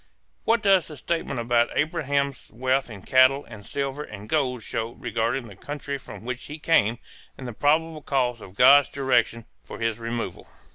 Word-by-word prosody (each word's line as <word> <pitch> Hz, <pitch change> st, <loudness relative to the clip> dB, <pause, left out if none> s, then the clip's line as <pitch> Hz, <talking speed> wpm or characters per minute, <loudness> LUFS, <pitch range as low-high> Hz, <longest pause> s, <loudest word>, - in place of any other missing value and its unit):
What 230 Hz, -1 st, +2 dB
does 195 Hz, -4 st, +4 dB
the 150 Hz, -, -9 dB
statement 165 Hz, -3 st, -2 dB
about 120 Hz, 0 st, +1 dB
Abraham's 140 Hz, -3 st, -1 dB
wealth 130 Hz, +3 st, 0 dB
in 100 Hz, -4 st, -10 dB
cattle 130 Hz, +2 st, +4 dB
and 110 Hz, -3 st, -11 dB
silver 140 Hz, +5 st, -3 dB
and 105 Hz, -7 st, -9 dB
gold 130 Hz, -5 st, 0 dB
show 115 Hz, +2 st, -3 dB
regarding 115 Hz, +3 st, -2 dB
the 100 Hz, -, -12 dB
country 140 Hz, +5 st, -5 dB
from 115 Hz, -, -11 dB
which 125 Hz, 0 st, -4 dB
he 150 Hz, -, -7 dB
came 120 Hz, -8 st, +2 dB, 0.4 s
and 130 Hz, -, -7 dB
the 120 Hz, -, -6 dB
probable 155 Hz, +5 st, +1 dB
cause 125 Hz, -5 st, 0 dB
of 95 Hz, -, -12 dB
God's 140 Hz, +4 st, +7 dB
direction 120 Hz, -4 st, +1 dB, 0.2 s
for -, -, -9 dB
his 115 Hz, -1 st, -1 dB
removal? 115 Hz, 0 st, -4 dB
130 Hz, 175 wpm, -25 LUFS, 115-145 Hz, 0.4 s, God's